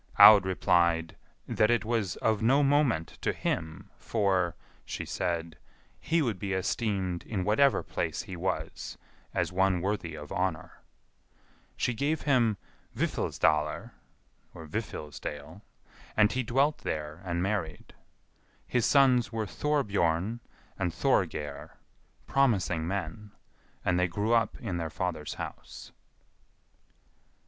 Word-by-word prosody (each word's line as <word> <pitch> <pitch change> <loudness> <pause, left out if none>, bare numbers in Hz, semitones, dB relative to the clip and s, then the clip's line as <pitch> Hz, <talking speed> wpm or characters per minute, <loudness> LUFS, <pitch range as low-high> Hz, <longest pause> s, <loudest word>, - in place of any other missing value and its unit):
Aud 100 -3 +9
replied, 85 -3 +2 0.3
"That 110 - +2
it 120 -1 +2
was 110 -5 0
of 110 -2 0
no 135 +6 +4
moment 135 - +2
to - - +1
him, 85 +5 -3
for," 95 -6 +1 0.3
she - - -5
said, 85 -3 -3 0.4
"he 165 0 +1
would 110 -8 -2
be 100 0 -2
esteemed 95 -2 -1
in 100 -4 -3
whatever 115 +7 +3
place - - -3
he 95 - -7
was, 90 +1 -4 0.4
as - - 0
one 95 0 +2
worthy 90 -3 -2
of 75 -1 -9
honour." 90 -3 -3 1.0
She 125 - 0
gave 145 +7 -1
him 120 -7 +3 0.4
Vifilsdalr 75 0 0 0.6
(Vifilsdale), 80 -2 -6 0.6
and 105 0 +5
he 130 - 0
dwelt 135 +5 +1
there 75 +2 -4
and 85 -1 -1
married. 95 -6 -3 0.7
His 125 -2 +1
sons 130 -3 +4
were 110 -1 -2
Thorbjorn 100 - 0 0.4
and 90 - 0
Thorgeir, 75 -3 -1 0.5
promising 95 -12 +1
men, 100 +2 -4 0.5
and 90 0 +2
they 90 - +3
grew 105 +7 0
up 115 -1 +2
in 95 -7 -3
their 85 -1 -3
father's 80 -2 -3
house. - - -8
95 Hz, 120 wpm, -29 LUFS, 85-115 Hz, 1.0 s, Aud